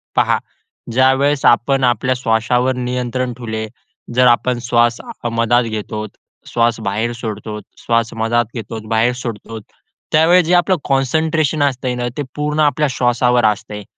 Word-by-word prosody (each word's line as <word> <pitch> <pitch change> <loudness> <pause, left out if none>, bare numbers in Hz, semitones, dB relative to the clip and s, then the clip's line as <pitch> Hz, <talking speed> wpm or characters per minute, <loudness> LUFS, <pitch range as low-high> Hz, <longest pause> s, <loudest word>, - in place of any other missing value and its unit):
पहा, - - +3 0.5
ज्यावेळेस 130 +3 +2
आपण 135 +3 +3
आपल्या 130 +1 +1
श्वासावर 125 +2 +1
नियंत्रण 125 0 -2
ठेवले, 110 -2 -5 0.5
जर 125 0 +5
आपण 120 0 +2
श्वासमध्यात 120 0 +1
घेतो 110 -1 -5 0.4
श्वासबाहेर 115 -1 0
सोडतो, 105 -2 -6
श्वासमध्यात 115 0 0
घेतो, 115 -1 -6
बाहेर 115 +2 +2
सोडतो, 115 -1 -6 0.5
त्यावेळेस 165 +3 +5
जे 175 - +1
आपलं 180 +2 +3
कॉन्संट्रेशन 155 +2 +1
असतंय 130 -2 -1
ना, 120 0 -2
ते 145 - -1
पूर्ण 150 +1 -2
आपल्या 150 0 +2
श्वासावर 125 -1 +2
असतंय. 105 0 -1
120 Hz, 120 wpm, -17 LUFS, 115-130 Hz, 0.5 s, जर